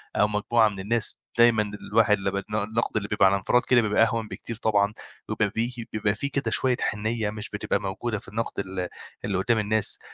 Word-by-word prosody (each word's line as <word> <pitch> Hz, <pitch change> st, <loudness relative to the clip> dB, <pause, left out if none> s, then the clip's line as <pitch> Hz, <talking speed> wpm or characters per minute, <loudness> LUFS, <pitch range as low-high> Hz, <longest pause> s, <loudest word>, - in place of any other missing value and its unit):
أو 105 Hz, -, +4 dB
مجموعة 110 Hz, +2 st, +2 dB
من 100 Hz, -2 st, -8 dB
الناس 110 Hz, +3 st, 0 dB
دايمًا 110 Hz, -3 st, +4 dB, 0.2 s
الواحد 105 Hz, -2 st, +4 dB
لمّا 95 Hz, -, -1 dB, 0.2 s
بن 105 Hz, -, -3 dB
النَقْد 110 Hz, +2 st, -1 dB
اللي 100 Hz, -1 st, -2 dB
بيبقى 105 Hz, -2 st, +3 dB
على 95 Hz, +1 st, +5 dB
انفراد 110 Hz, +5 st, +2 dB
كده 120 Hz, -2 st, +5 dB
بيبقى 110 Hz, +1 st, +3 dB
أهون 115 Hz, -1 st, 0 dB
بكتير 115 Hz, +1 st, -7 dB
طبعًا 105 Hz, -2 st, +1 dB, 0.4 s
وبيبقى 105 Hz, -2 st, 0 dB
بي 115 Hz, 0 st, -3 dB
بيبقى 105 Hz, -1 st, 0 dB
فيه 140 Hz, +6 st, -3 dB
كده 135 Hz, -5 st, -1 dB
شوية 130 Hz, +2 st, +2 dB
حِنّية 110 Hz, 0 st, -1 dB
مش 105 Hz, +1 st, -5 dB
بتبقى 105 Hz, -, -1 dB
موجودة 105 Hz, +3 st, -3 dB
في -, -, -15 dB
النَقْد 110 Hz, 0 st, -4 dB
ال 95 Hz, -2 st, -3 dB, 0.4 s
اللي 100 Hz, -2 st, -1 dB
قُدّام 115 Hz, +4 st, +1 dB
الناس. 105 Hz, 0 st, +4 dB
110 Hz, 200 wpm, -25 LUFS, 105-115 Hz, 0.4 s, على